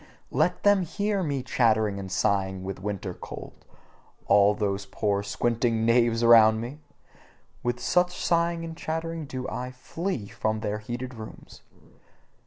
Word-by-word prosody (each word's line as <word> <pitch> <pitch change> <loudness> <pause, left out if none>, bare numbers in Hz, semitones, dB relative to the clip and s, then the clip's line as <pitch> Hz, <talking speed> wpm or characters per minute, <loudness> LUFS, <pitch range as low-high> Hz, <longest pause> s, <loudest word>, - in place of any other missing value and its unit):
Let - - +1
them 205 -1 +5
HEAR 200 +3 -1
me 140 -6 -2
chattering 110 -5 +2
and 95 -1 -7
sighing 95 -1 0
with 95 0 -6
winter 100 -2 -4
cold, - - -10 0.6
all 100 +1 +5
those 100 -2 -2
poor 100 0 0
squinting 115 +1 0
knaves 115 0 +3
around 110 -2 +7
me! 125 +6 -6 0.8
With 120 0 -1
such 180 +7 +2
sighing 170 0 +1
and 165 0 -7
chattering 160 -1 -4
do 130 -2 -5
I 125 0 -4
flee 135 - -4
from 110 +1 -2
their 105 -1 -2
heated 120 +4 -5
rooms. 110 -2 -11
115 Hz, 140 wpm, -26 LUFS, 105-155 Hz, 0.8 s, around